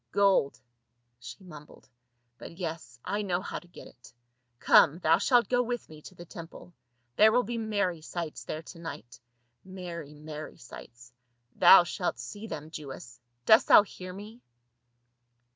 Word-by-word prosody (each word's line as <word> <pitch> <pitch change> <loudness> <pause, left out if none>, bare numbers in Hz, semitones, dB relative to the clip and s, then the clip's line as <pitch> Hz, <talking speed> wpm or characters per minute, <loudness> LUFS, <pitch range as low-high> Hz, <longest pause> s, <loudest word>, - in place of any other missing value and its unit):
"Gold," 190 -11 +2 0.6
she 190 - -11
mumbled. 150 -5 -14 0.3
" 120 0 -48
But 165 - -11
yes 160 -9 -6
— - - -25
I 210 - -1
know 180 -4 -1
how 190 - -6
to 175 - -21
get 175 - -13
it. 120 - -17 0.5
Come, 145 +5 +5
thou 165 -1 +3
shalt 240 +3 +3
go 245 0 +2
with 240 -1 -4
me 155 -1 -13
to 185 - -13
the 175 - -11
temple, 170 +1 -11 0.4
there 220 +1 +7
will 245 +2 +3
be 235 +2 -4
merry 200 -6 -1
sights 165 0 -6
there 155 +1 -6
to 165 - -12
night 120 -8 -9 0.3
— 120 0 -49
merry, 175 -5 -8
merry 155 0 -9
sights. 120 0 -13 0.4
Thou 180 0 +8
shalt 175 - -3
see 205 - -8
them, 155 -4 -7
Jewess; 135 -5 -9 0.3
dost 220 +5 +6
thou - - +8
hear 185 -2 -10
me?" 210 +5 -11
170 Hz, 165 wpm, -28 LUFS, 150-200 Hz, 0.6 s, Thou